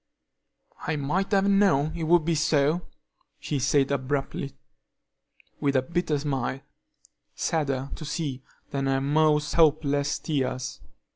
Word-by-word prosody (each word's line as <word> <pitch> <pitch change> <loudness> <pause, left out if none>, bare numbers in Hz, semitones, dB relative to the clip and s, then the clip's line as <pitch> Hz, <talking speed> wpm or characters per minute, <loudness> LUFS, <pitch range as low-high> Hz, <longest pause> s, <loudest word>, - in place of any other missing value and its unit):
"I 160 - 0
might 150 +8 -1
have 200 -1 +3
known 190 -7 +3
it 165 -1 -3
would 170 -1 +4
be 170 - +2
so," 155 +1 +1 0.5
she 145 - -2
said 135 +1 +2
abruptly, 140 0 -2 1.1
with 140 -1 0
a 130 - +3
bitter 170 0 -1
smile, 135 -2 -2 0.7
sadder 140 -4 -1
to - - -7
see 150 -4 -3 0.3
than 135 -1 -1
her 135 0 +2
most 150 +1 +2
hopeless 145 -3 +3
tears. 130 -4 -3
145 Hz, 125 wpm, -26 LUFS, 135-160 Hz, 1.1 s, would